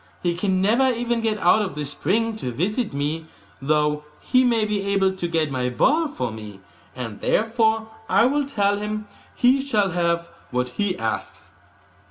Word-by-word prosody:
He 175 -1 +1
can 185 +1 0
never 240 +6 +4
even 240 -1 -1
get 220 -1 0
out 205 +2 +4
of 195 -6 -3
the 150 0 -3
spring 215 +11 -1
to 125 - -4
visit 205 - -1
me, 150 +3 -3 0.3
though 150 +1 +1 0.2
he 255 0 +3
may 230 -3 +2
be 210 -1 -1
able 195 -1 +2
to 175 -2 -3
get 160 -3 0
my 125 -1 -1
ball 305 - +2
for 125 - -3
me, 105 -3 -9 0.4
and 115 -5 -6
therefore 220 0 +1 0.2
I - - +5
will 285 +2 +1
tell 205 -6 +1
him 210 0 -4 0.3
he 255 +2 +4
shall 215 -8 +1
have 170 -1 0 0.2
what 125 0 -1
he 200 +7 -1
asks. 110 -1 -4
200 Hz, 175 wpm, -23 LUFS, 150-225 Hz, 0.4 s, I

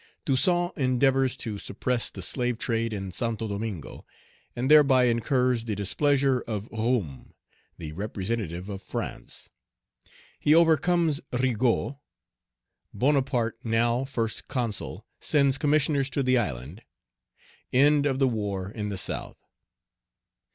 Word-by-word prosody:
Toussaint 175 +6 +2
endeavors 130 -1 +2
to 105 -5 -5
suppress 120 +5 -1
the 95 - -8
slave 125 +3 -1
trade 115 -1 -1
in 95 -3 -4
Santo 115 +1 -2
Domingo, 100 - -5 0.5
and 130 +4 0
thereby 135 -4 +7
incurs 125 0 +1
the 110 -3 -2
displeasure 135 +6 +2
of 105 -2 -3
Roume, 110 - -2 0.4
the 80 -2 -7
representative 95 -1 -4
of 100 -2 -6
France - - -6 0.9
He 150 - +4
overcomes 165 -1 +3
Rigaud 125 +2 0 1.0
Bonaparte, 130 -4 +1
now 115 +2 +1
First 115 -5 -3
Consul, 120 -6 -3
sends 140 -2 +2
Commissioners 145 -2 +2
to 140 - -1
the 130 0 +3
island 75 - -2 0.9
End 145 +2 +4
of 135 -2 0
the 135 -1 +3
war 100 -5 -3
in 105 -2 -4
the 100 - -4
South. - - -3
125 Hz, 115 wpm, -26 LUFS, 105-135 Hz, 1.0 s, thereby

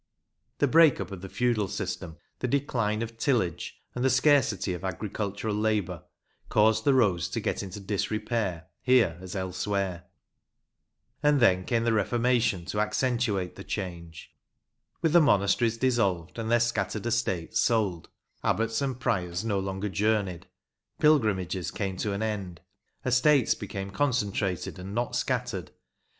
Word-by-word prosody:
The 145 - +3
break 160 +1 +6
up - - -5
of 95 -2 -7
the 95 - -7
feudal 120 -4 +1
system, 85 -2 -5 0.2
the 125 - -1
decline 115 -5 0
of 115 0 -8
tillage, 115 - -1
and 125 - -3
the 130 - +4
scarcity 130 -8 +3
of 90 +1 -7
agricultural 100 +3 -3
labour, 105 -5 -1 0.4
caused 110 +4 +3
the 140 -2 +5
roads 95 -9 +2
to - - -2
get - - -2
into 95 +1 -7
disrepair 105 -3 -2 0.2
here 115 -10 +3
as 95 +1 -7
elsewhere. 95 -1 -2 1.2
And 150 -1 +4
then 95 -6 +4
came 115 -2 +1
the 115 -1 +2
Reformation 115 -4 +1
to 105 +3 -3
accentuate 105 -4 0
the 100 - -8
change. 85 -5 -6 0.7
With 160 -2 +2
the 175 - +7
monasteries 115 -2 +3
dissolved, 110 -8 0
and 110 -1 -3
their 120 0 +4
scattered 110 -2 -1
estates 110 -8 -1
sold, 105 -8 +1 0.3
abbots 115 +3 0
and 130 -3 -2
priors 95 -6 -1
no 100 -3 0
longer 95 +1 -3
journeyed 100 -2 0 0.5
Pilgrimages 100 - +2
came 95 -1 -3
to 105 - -2
an 100 +2 -2
end 100 -6 -4 0.4
Estates 130 +1 +4
became 100 -1 -6
concentrated 100 -8 -1
and 95 +3 -7
not 120 +1 -1
scattered. - - -2
105 Hz, 140 wpm, -28 LUFS, 95-120 Hz, 1.2 s, the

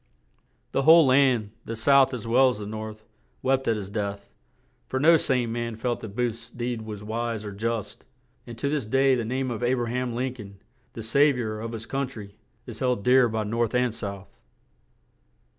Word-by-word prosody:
The - - +1
whole 160 +3 +7
land, 130 -5 +3
the 115 - -4
South 135 +3 +4
as 125 -4 -5
well 130 +3 +5
as 125 - -3
the 105 - -6
North, 110 0 -7 0.4
wept 135 0 +1
at 115 - +3
his 100 -2 -6
death; 100 -1 -4 0.6
for 130 - -2
no 165 +4 +6
sane 125 -6 +1
man 115 -1 -3
felt 120 +2 -2
that 105 -2 -9
Booth's 115 -1 -2
deed 120 -1 -4
was 105 -2 -7
wise 115 0 -3
or 105 - -5
just; 110 +1 -4 0.4
and 120 -1 -9
to 140 - -2
this 140 -6 -1
day 135 +3 +3
the 120 -2 0
name 130 +3 -2
of 115 - -4
A 125 +1 +2
bra 120 -2 -1
ham 125 0 -2
Lin 125 +1 -2
coln, 100 -5 -11 0.4
the 115 - -7
"Sav 140 +5 +4
iour 110 -3 -4
of 115 0 -5
his 115 0 -6
Coun 135 +3 -2
try," 110 -6 -10 0.3
is 115 -3 -9
held 125 -5 0
dear 125 -1 +5
by 110 0 -2
North 115 +2 -1
and 125 -2 +2
South. 100 -3 -7
120 Hz, 200 wpm, -26 LUFS, 110-130 Hz, 0.6 s, whole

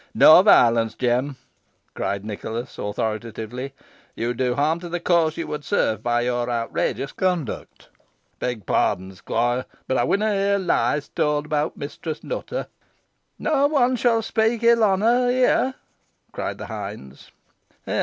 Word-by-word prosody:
"No 155 +3 +9
violence, 115 - +4
Jem," 125 +3 0 0.6
cried 100 0 -3
Nicholas, 110 +3 -6
authoritatively 110 +4 -4 0.4
"you 120 +1 -1
do 125 0 0
harm 155 +4 +1
to 175 0 -8
the 175 +1 -2
cause 170 -2 +2
you 165 - -3
would 150 -1 -5
serve 110 - 0
by 120 +1 +1
your 120 0 -1
outrageous 120 +3 -2
conduct." 180 - -3 0.5
"Beg 120 -5 -3
pardon, 95 +1 0
squoire," 120 +6 -1
replied 130 - -5
Jem, - - -31
"boh 130 - +1
ey - - +1
winna 210 +1 +1
hear 200 0 +2
lies 145 -6 0
towd 150 0 0
abowt 150 -1 -1
Mistress 155 +2 -6
Nutter." - - -4 0.7
"No 285 -2 +2
one 260 -4 +2
shan 230 -2 +2
speak 225 +1 0
ill 230 -1 +5
on 195 -2 +3
her 245 +3 +3
here," 255 +1 +2 0.6
cried - - -4
the - - -7
hinds. 65 +1 -8
145 Hz, 145 wpm, -23 LUFS, -, 0.7 s, No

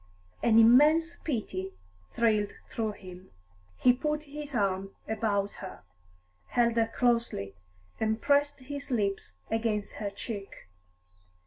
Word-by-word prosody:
An 225 -1 +4
immense 300 +9 +6
pity 195 - -3 0.4
thrilled 215 -3 +1 0.2
through 220 -2 -2
him. 185 -2 -12 0.5
He 250 - +5
put 300 +4 -2
his 295 -1 -7
arm 195 -2 0
about 205 -2 0
her, 190 - -8 0.6
held 235 -1 +2
her 225 -1 +3
closely, 235 - +1 0.5
and 220 0 0
pressed 285 +1 +2
his 285 +2 -6
lips 200 - -1 0.2
against 220 -2 -1
her 205 -2 -2
cheek. 200 - -7
225 Hz, 115 wpm, -29 LUFS, 200-265 Hz, 0.6 s, immense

